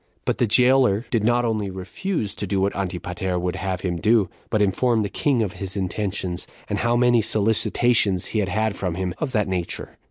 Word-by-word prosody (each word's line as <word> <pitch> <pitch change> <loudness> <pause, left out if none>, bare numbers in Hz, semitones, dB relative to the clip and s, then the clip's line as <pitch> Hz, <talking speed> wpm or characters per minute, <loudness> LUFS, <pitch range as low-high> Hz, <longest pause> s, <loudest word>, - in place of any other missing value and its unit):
But - - -1
the 120 - +3
jailer 125 -1 +4
did 115 -4 +1
not 120 +2 +2
only 110 -3 -1
refuse 100 - -3
to 100 - -4
do 95 +1 0
what 100 +1 0
Antipater 90 -1 -3
would 90 +1 -2
have 95 -2 -3
him, 85 -3 -2 0.5
but 110 - +1
informed 110 +3 +2
the - - -3
king 130 -1 +1
of 100 -2 -3
his 95 -1 -4
intentions, 95 -2 -2 0.2
and - - -2
how 120 0 +2
many 120 -1 +4
solicitations 110 -2 +2
he 110 - +1
had 100 -3 0
had 110 +2 0
from 90 -3 -3
him 90 -1 -2
[of 150 -4 -2
that 105 -3 +1
nature]. 90 -2 -4
100 Hz, 195 wpm, -23 LUFS, 95-115 Hz, 0.5 s, jailer